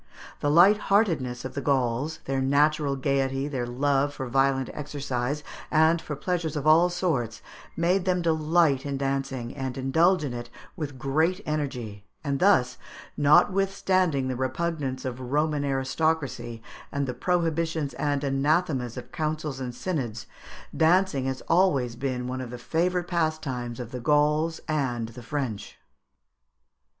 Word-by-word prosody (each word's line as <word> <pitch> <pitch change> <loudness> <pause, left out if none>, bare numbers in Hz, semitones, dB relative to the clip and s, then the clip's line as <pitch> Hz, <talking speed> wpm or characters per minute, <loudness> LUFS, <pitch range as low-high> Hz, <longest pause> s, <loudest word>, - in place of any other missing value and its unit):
The 145 - 0
lightheartedness 175 - +3
of 130 - -5
the 140 - -3
Gauls, 135 +3 0
their 135 0 -1
natural 145 +1 +2
gaiety, 135 0 0
their 130 -4 -3
love 140 +3 +1
for 130 - -4
violent 135 +1 +1
exercise 140 -1 -3 0.3
and 160 +2 +4
for 150 - -5
pleasures 170 -1 -2
of 145 -1 -3
all 165 +3 +6
sorts, 145 - -2 0.3
made 180 +3 +2
them 180 -2 +1
delight 160 -3 +2
in 140 -1 -3
dancing, 135 -3 -2
and 130 -2 -4
indulge 160 +7 +3
in 135 -4 -3
it 120 0 -6 0.3
with 145 -4 -5
great 160 +9 +1
energy; 125 -9 -3 0.2
and 140 -2 -1
thus, 130 -11 +3 0.4
notwithstanding 185 -1 +3
the 130 - -2
repugnance 130 0 -2
of 125 -2 -3
the 130 - -8
Roman 150 +3 0
aristocracy 135 -4 -1 0.3
and 140 0 -1
the 125 - -3
prohibitions 165 0 0
and 145 -1 -1
anathemas 135 -2 0
of 125 - -8
councils 155 -3 -3
and 125 -2 -5
synods, 125 - -3 0.5
dancing 160 -2 +3
has 130 -1 -3
always 140 -10 +2
been 125 -1 -3
one 130 +1 -3
of 125 - -6
the 125 - -7
favourite 175 +7 0
pastimes 155 -9 -2
of 120 -1 -6
the 125 - -5
Gauls 150 +4 +2
and 125 -7 -1
the 115 +2 -10
French. 120 -5 -4
140 Hz, 140 wpm, -26 LUFS, 130-160 Hz, 0.5 s, all